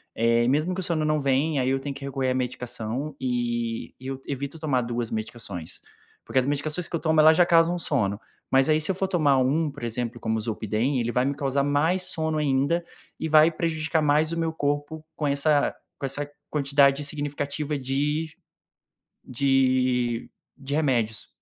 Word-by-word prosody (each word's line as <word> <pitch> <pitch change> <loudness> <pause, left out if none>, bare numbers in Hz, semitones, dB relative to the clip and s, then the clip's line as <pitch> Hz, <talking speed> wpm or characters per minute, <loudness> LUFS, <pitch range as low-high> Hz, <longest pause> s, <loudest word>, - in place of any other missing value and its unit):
eh, 115 +1 +3
e - - +1
mesmo 155 +7 +1
que 185 - -4
o - - -3
sono 165 -3 0
não 155 0 +1
vem, 140 +2 +1
aí 130 - +1
eu 135 0 +1
tenho 140 0 -4
que 140 - -7
recorrer 135 -1 -1
à - - +1
medicação 125 +2 -3
e 120 -2 -2
e 130 - -9
eu 135 0 -5
evito 140 +2 -4
tomar 140 -5 +1
2 120 -1 -3
medicações, 110 -6 -5 0.4
porque 130 - +1
as 130 - 0
medicações 150 +4 0
que - - -4
eu - - -1
tomo, 160 -1 +2
ela 155 +1 +8
já 175 +2 +5
causam 170 +1 +4
sono, 110 - +2 0.3
mas 135 0 +4
aí 155 0 +3
se 155 - -2
eu - - -3
for 190 +1 -1
tomar 155 -7 +3
um, 145 +5 +1
por 145 -2 -11
exemplo, 120 +1 -3
como 110 -1 -1
o - - -1
Zolpidem, 110 +4 -1
ele 120 0 -1
vai 125 +1 +1
me 140 +1 -1
causar 140 0 0
mais 155 +6 +1
sono 160 -1 -1
ainda 145 +4 +1 0.4
e 160 - -2
vai 155 +1 +6
prejudicar 160 -1 -1
mais 150 +2 +3
o 165 - -2
meu 165 -1 0
corpo 145 +1 -2
com 150 - -1
essa 145 +1 +2 0.2
com - - -3
essa 140 +2 -3 0.2
quantidade 140 -1 +3
significativa 145 0 -3
de 145 +4 -1 0.9
de 130 -2 +1 0.3
de 140 0 -5
remédios. 120 -8 0
140 Hz, 190 wpm, -25 LUFS, 125-155 Hz, 0.9 s, ela